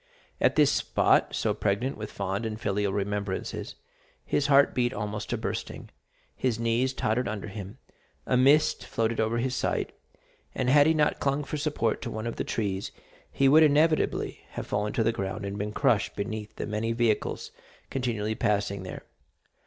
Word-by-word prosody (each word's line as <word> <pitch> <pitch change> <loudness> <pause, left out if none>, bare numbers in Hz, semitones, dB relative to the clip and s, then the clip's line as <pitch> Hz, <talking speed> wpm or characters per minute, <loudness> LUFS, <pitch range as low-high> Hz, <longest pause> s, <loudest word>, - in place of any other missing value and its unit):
At - - +3
this 150 -2 +5
spot, - - +2
so - - +1
pregnant 105 +7 -1
with 105 0 -7
fond 100 +2 -3
and 110 -1 -4
filial 100 -2 0
remembrances, 100 -1 -3 0.5
his 145 - +1
heart 140 0 +5
beat 125 0 0
almost 105 0 -4
to - - -1
bursting, - - -5 0.4
his 125 -4 0
knees 115 +3 +1
tottered 125 0 0
under 105 -1 -4
him, 100 +3 -8 0.5
a - - +1
mist 140 +5 +4
floated 115 0 -1
over 110 +1 +1
his 125 +2 -1
sight, - - -1 0.6
and 130 -1 +1
had 145 +1 +6
he 160 - +3
not 150 -1 +2
clung 140 +1 0
for 150 - -4
support 145 -7 -1
to - - -4
one 110 +1 -5
of 115 - -4
the - - -1
trees, 100 -3 -2 0.4
he 135 - +3
would 155 +4 +7
inevitably 155 +1 +2
have - - -5
fallen 105 +1 -1
to 115 - +1
the 115 - +3
ground 100 -2 -4
and 100 +1 -4
been 105 +1 -2
crushed 105 -1 +1
beneath 105 +1 -5
the - - -4
many 110 +2 -1
vehicles 115 -2 0 0.4
continually 115 -5 -1
passing 105 -3 0
there. 90 - -7
115 Hz, 175 wpm, -27 LUFS, 105-130 Hz, 0.6 s, would